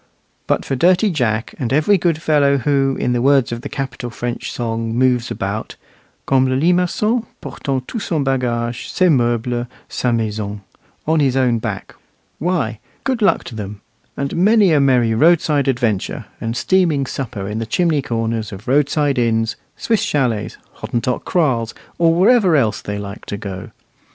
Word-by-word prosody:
But - - 0
for 135 - -1
dirty 185 - +3
Jack, 115 -7 -1
and 125 -2 -2
every 155 +9 +4
good 170 -3 +1
fellow 145 -3 +3
who, 135 0 +1
in 125 - 0
the 120 - 0
words 135 -2 +3
of 120 0 -4
the - - -6
capital 125 -3 -5
French 120 +1 -4
song, 115 -1 -3
moves 125 -1 +2
about, 100 +3 -4 0.5
"Comme 130 -1 +3
le 130 - +1
limacon, 180 - +1
Portant 130 -2 -4
tout 230 - -4
son 160 -8 -1
bagage, 120 -3 -1
Ses 185 -2 +3
meubles, 120 -2 0 0.2
sa 125 - -1
maison," 105 -3 -2 0.4
on 160 +1 +2
his 135 -3 +2
own 125 -3 +2
back, - - -5 0.5
why, 145 - -1 0.2
good 260 -4 -1
luck 205 - +3
to - - -9
them, 105 -1 -7 0.4
and 140 0 -2
many 200 +1 +4
a 150 - +4
merry 125 -5 +3
roadside 150 +1 +3
adventure, 120 -6 -1 0.2
and 115 +1 -3
steaming 170 -7 +2
supper 120 -7 -5
in 105 +2 -3
the 115 - -4
chimney 160 +3 +1
corners 115 -3 -2
of 95 +1 -10
roadside 145 0 +2
inns, 115 -1 +1 0.2
Swiss 225 -4 0
chalets, 125 -7 -1 0.2
Hottentot 120 +1 -2
kraals, 130 -10 0 0.2
or 165 -1 +5
wherever 190 -1 +4
else 115 -7 +1
they 105 0 -4
like 100 +1 -7
to 100 - -4
go. 95 -2 -7
130 Hz, 165 wpm, -19 LUFS, 115-155 Hz, 0.5 s, or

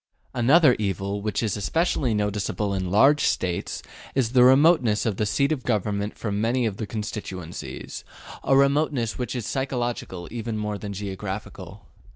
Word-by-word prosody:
Another 130 +3 +5
evil, 100 0 -2
which 105 +1 -1
is 110 - 0
especially 125 - 0
noticeable 105 0 -1
in 95 -2 -2
large 135 +10 +5
States, 90 -2 -1 0.3
is 125 -4 +1
the 125 -1 +6
remoteness 130 -4 +5
of 105 -4 -1
the 105 - 0
seat 140 +8 +1
of 150 -4 -1
government 105 -3 -1
from 105 -2 -2
many 120 +2 +1
of 105 -3 -2
the 110 - -4
constituencies 95 -5 -6 0.4
a 135 - +4
remoteness 140 -4 +2
which 125 +1 -3
is 120 -4 -3
psychological 120 -9 -3
even 115 -1 -4
more 105 -1 -3
than 105 - -6
geographical. 95 -1 -6
110 Hz, 155 wpm, -25 LUFS, 100-125 Hz, 0.4 s, the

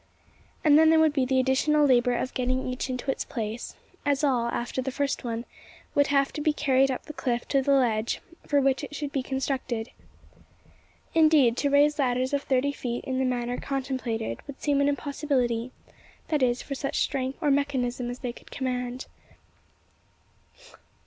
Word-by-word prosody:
And 300 -1 +6
then 320 0 +6
there 320 0 +5
would 315 -2 +4
be 270 -3 +1
the 260 0 +2
additional 280 +3 +3
labour 245 -2 +3
of 255 - -3
getting 255 +1 -1
each 255 +1 -3
into 255 +2 -2
its - - -3
place: 225 -1 -5 0.3
as 285 0 +1
all, 250 -5 +2
after 240 +2 -2
the 260 - -3
first 280 +1 -2
one, 235 0 -3 0.5
would 285 0 +3
have 275 -1 +2
to 300 - -4
be 305 0 +2
carried 270 -2 +3
up 260 - -3
the 305 - -8
cliff 245 -4 -2
to 275 - +3
the 280 +1 +2
ledge 235 -4 +1 0.3
for 285 - +3
which 275 +1 +1
it 295 - -7
should 290 -1 -4
be 275 - -1
constructed. 260 -3 -3 1.2
Indeed, 310 -7 +5
to 285 - +1
raise 295 +2 +4
ladders 255 0 +1
of 285 - +1
thirty 270 0 +1
feet 245 -4 -4
in 260 -1 -2
the 265 - +1
manner 245 -1 -1
contemplated, 260 -5 -3
would 280 -1 -9
seem 285 -1 +1
an 280 - +3
impossibility 260 -4 -1 0.6
that 300 -3 +1
is, 245 -1 +1
for 280 - -5
such 275 +1 -2
strength 265 -1 -2
or 300 -4 +2
mechanism 260 -3 0
as 245 +1 -7
they 245 -3 -3
could - - -16
command. 250 -1 -3
265 Hz, 180 wpm, -27 LUFS, 250-285 Hz, 1.2 s, And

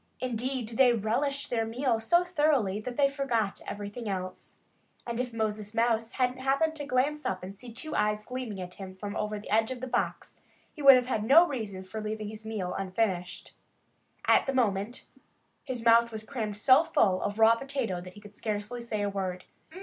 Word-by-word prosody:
Indeed, 245 -1 -3
they 255 -2 +6
relished 255 +6 -1
their 230 -2 +1
meal 235 +1 0
so 345 +11 +3
thoroughly 295 - +1
that 245 +2 -6
they 280 -1 +5
forgot 245 -7 -1
everything 205 +2 -5
else. 185 -1 -5 0.5
And 235 0 -3
if 250 -1 -2
Moses 215 -1 -3
Mouse 230 0 +1
hadn't 255 0 0
happened 275 +5 +1
to 290 -1 -5
glance 290 +3 +1
up 185 -1 -2
and 190 +2 -7
see 240 +4 -11
two 310 +7 -5
eyes 210 0 +1
gleaming 250 -6 -5
at 180 -1 -6
him 190 -1 -9
from 200 +2 -6
over 210 0 -2
the 205 - -9
edge 220 +1 +3
of 260 -1 -4
the 260 - -4
box 245 -1 -2 0.3
he 300 - -9
would 275 -2 +10
have 250 -1 +2
had 225 -4 -1
no 320 +10 +7
reason 215 - -5
for 215 +4 -6
leaving 215 0 -4
his 220 0 -9
meal 200 -5 -3
unfinished. 185 -2 -2 0.7
At - - +4
the 270 - 0
moment, 215 -1 0 0.6
his 245 -3 -4
mouth 235 0 +6
was 220 -1 -6
crammed 220 -5 -4
so 260 +7 +6
full 190 - +2
of 205 - -2
raw 225 0 +7
potato 235 -7 -3
that 180 0 -10
he 205 - -13
could 205 -1 -13
scarcely 215 +3 -4
say 215 -3 -3
a - - +1
word. 185 -2 -4
225 Hz, 195 wpm, -29 LUFS, 205-255 Hz, 0.7 s, would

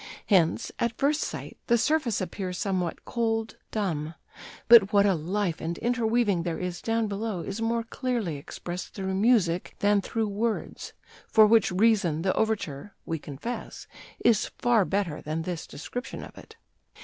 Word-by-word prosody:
Hence, 175 -6 +2
at 235 -1 -1
first 290 +2 +2
sight, - - -5
the 235 - +4
surface 255 -5 +1
appears 185 -1 -4
somewhat 185 -4 -2
cold, 225 -2 -1
dumb; 165 -7 -2 0.5
but 225 -4 +8
what 200 -1 +5
a 200 - +4
life 180 +2 -2
and 165 +1 -3
interweaving 230 -5 +1
there 165 -1 -2
is 180 -1 -4
down 225 0 0
below 205 -2 -3
is 200 +5 -5
more 230 0 0
clearly 230 - -2
expressed 175 +5 -7
through 190 -1 -3
music 190 -4 +2
than 205 0 +3
through 225 +2 -2
words, 215 +2 -3 0.3
for 220 -1 +6
which 220 -2 +4
reason 185 -5 +2
the 185 - +2
overture 200 -5 -2
(we 165 -1 -3
confess) 150 - -6 0.4
is 225 -3 +4
far 235 -5 +3
better 190 -6 -1
than 155 +2 -3
this 175 -1 -4
description 245 - -6
of - - -11
it." - - -14
205 Hz, 155 wpm, -27 LUFS, 175-225 Hz, 0.5 s, but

